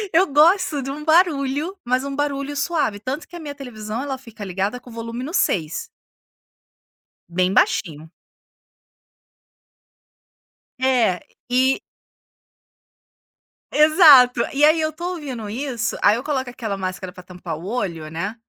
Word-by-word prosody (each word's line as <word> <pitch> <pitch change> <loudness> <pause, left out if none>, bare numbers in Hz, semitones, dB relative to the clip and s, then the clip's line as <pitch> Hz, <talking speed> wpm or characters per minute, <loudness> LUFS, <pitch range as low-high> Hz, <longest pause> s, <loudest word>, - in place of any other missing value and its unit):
eu 365 +4 +4
gosto 315 0 +3
de 270 - -5
um 300 +2 -6
barulho, 315 +1 +2
mas 255 +2 0
um 280 0 -4
barulho 285 0 -2
suave, 280 -9 0
tanto 265 +7 -4
que 350 - -10
a - - -8
minha 290 -2 -7
televisão 230 -3 -6
ela 270 -2 -4
fica 230 -4 -10
ligada 195 +6 -2
com 250 - -14
o - - -12
volume 230 +2 -6
no 295 - -5
6. 165 - 0 1.4
Bem 185 +2 0
baixinho. 160 -3 +1 2.7
É, 245 -8 +2 0.3
e 260 +2 +2 1.9
Exato. 300 -6 +7
E 285 - +1
aí, 310 +2 +6
eu 310 0 0
tô 345 +4 -5
ouvindo 255 -9 -6
isso, 240 -1 -3
aí 205 +1 +5
eu 245 - -4
coloco 265 -4 -2
aquela 220 -5 -4
máscara 185 -1 -5
pra 180 0 -13
tampar 180 -3 -7
o 170 - -10
olho, 170 -9 -3
né. 180 +8 -4
255 Hz, 140 wpm, -21 LUFS, 205-290 Hz, 2.7 s, Exato